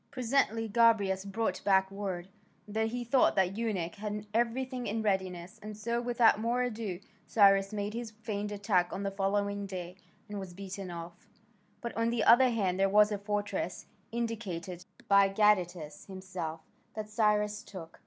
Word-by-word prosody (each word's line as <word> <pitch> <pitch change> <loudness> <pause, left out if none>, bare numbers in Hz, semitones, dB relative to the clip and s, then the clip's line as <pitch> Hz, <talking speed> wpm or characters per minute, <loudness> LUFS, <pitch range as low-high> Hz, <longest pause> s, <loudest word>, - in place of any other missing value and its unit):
Presently 240 -3 +1
Gobryas 205 -4 +3
brought 220 +3 -2
back 190 -1 +3
word 190 -3 -4 0.4
that 220 +2 0
he 240 +2 -3
thought 255 +2 +3
the 190 - +4
eunuch 195 -3 -2
had 210 0 -5
everything 245 +2 -1
in 220 +2 -2
readiness, 185 -3 -2
and 210 0 -8
so, 235 +3 -1
without 240 -3 +4
more 240 +3 +1
ado, 220 -7 -3 0.3
Cyrus 195 -2 +5
made 205 0 -3
his 235 0 -4
feigned 210 -1 -5
attack 200 -3 +1
on 195 - -4
the 200 - -1
following 200 +1 -1
day, 180 -1 -6 0.3
and 205 -1 -5
was 185 -2 -8
beaten 195 0 -6
off. 170 0 -9 0.5
But 235 - -5
on 230 0 +1
the 235 -2 0
other 255 +2 +7
hand 195 -6 0
there 195 0 +4
was 210 +1 +5
a 205 - -2
fortress, 205 -2 -3 0.3
indicated 195 -7 -4 0.2
by 200 -1 +6
Gadatas 180 -7 +1
himself, 185 -4 -6 0.3
that 215 -1 -4
Cyrus 210 -1 +1
took. 165 -4 -10
205 Hz, 160 wpm, -31 LUFS, 190-225 Hz, 0.5 s, other